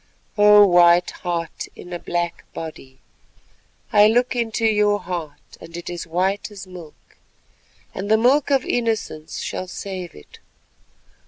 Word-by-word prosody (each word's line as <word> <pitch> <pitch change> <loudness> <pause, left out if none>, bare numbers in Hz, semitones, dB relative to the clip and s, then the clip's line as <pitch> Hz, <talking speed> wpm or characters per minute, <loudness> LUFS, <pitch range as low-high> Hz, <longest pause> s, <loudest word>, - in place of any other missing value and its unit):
"O 210 0 +7
White 175 -1 +5
Heart 170 -2 -4
and 175 -1 -8
black 175 -1 -3
body, 135 -5 -8 1.0
I 210 0 +7
look 245 +3 +2
into 230 -1 -1
your 210 -1 +3
heart 160 -6 -7
and 165 +1 -9
it 175 0 -6
is 175 -1 -6
white 190 +6 -1
as 200 -2 -10
milk, 180 -4 -14 0.8
and 200 - -5
the 220 - +5
milk 260 +6 +3
of 270 -2 +2
innocence 220 -10 -2
shall 185 - -4
save 185 -1 -7
it. 75 - -15
185 Hz, 135 wpm, -21 LUFS, 170-215 Hz, 1.0 s, O